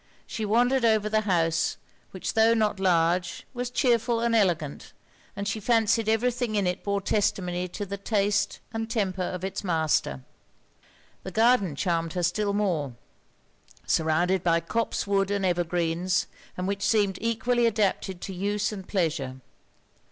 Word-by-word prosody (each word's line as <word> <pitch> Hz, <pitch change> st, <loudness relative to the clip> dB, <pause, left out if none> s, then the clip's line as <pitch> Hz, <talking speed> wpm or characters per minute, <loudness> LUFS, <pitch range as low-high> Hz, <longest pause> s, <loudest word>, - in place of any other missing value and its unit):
She 220 Hz, -, -4 dB
wandered 245 Hz, +4 st, +2 dB
over 220 Hz, -2 st, +3 dB
the 215 Hz, 0 st, +2 dB
house; 165 Hz, -2 st, +1 dB, 0.3 s
which 185 Hz, -, -4 dB
tho' 225 Hz, +1 st, +4 dB
not 215 Hz, -3 st, +1 dB
large 175 Hz, -1 st, +1 dB
was 245 Hz, -1 st, -3 dB
chearful 240 Hz, -2 st, +2 dB
and 235 Hz, 0 st, +1 dB
elegant, 175 Hz, -9 st, 0 dB, 0.4 s
and 200 Hz, 0 st, -4 dB
she 210 Hz, +2 st, -2 dB
fancied 225 Hz, 0 st, +2 dB
every 225 Hz, +3 st, +2 dB
thing 240 Hz, -2 st, -3 dB
in 200 Hz, -2 st, +1 dB
it 180 Hz, 0 st, -2 dB
bore 200 Hz, -1 st, -1 dB
testimony 180 Hz, -3 st, 0 dB
to 205 Hz, +3 st, -5 dB
the 200 Hz, +1 st, -5 dB
taste 205 Hz, -1 st, 0 dB
and 225 Hz, 0 st, -3 dB
temper 195 Hz, -5 st, -1 dB
of 180 Hz, 0 st, -3 dB
its 190 Hz, +1 st, -4 dB
master. 160 Hz, -, 0 dB, 1.0 s
The -, -, -6 dB
garden 220 Hz, -, +3 dB
charmed 165 Hz, +1 st, -1 dB
her 180 Hz, -1 st, -2 dB
still 200 Hz, +4 st, +1 dB
more; 175 Hz, -10 st, 0 dB, 0.9 s
surrounded 170 Hz, +3 st, +1 dB
by 170 Hz, -1 st, +3 dB
copse 220 Hz, +8 st, -2 dB
wood 195 Hz, -1 st, +1 dB
and 200 Hz, -1 st, 0 dB
ever 175 Hz, -1 st, +1 dB
greens, 175 Hz, +2 st, 0 dB, 0.3 s
and 180 Hz, 0 st, -2 dB
which 200 Hz, 0 st, -2 dB
seemed 205 Hz, -3 st, +1 dB
equally 230 Hz, +1 st, +1 dB
adapted 200 Hz, -4 st, -1 dB
to 195 Hz, -, -5 dB
use 205 Hz, +3 st, -1 dB
and 195 Hz, -3 st, -8 dB
pleasure. 155 Hz, -9 st, -1 dB
200 Hz, 155 wpm, -26 LUFS, 175-220 Hz, 1.0 s, tho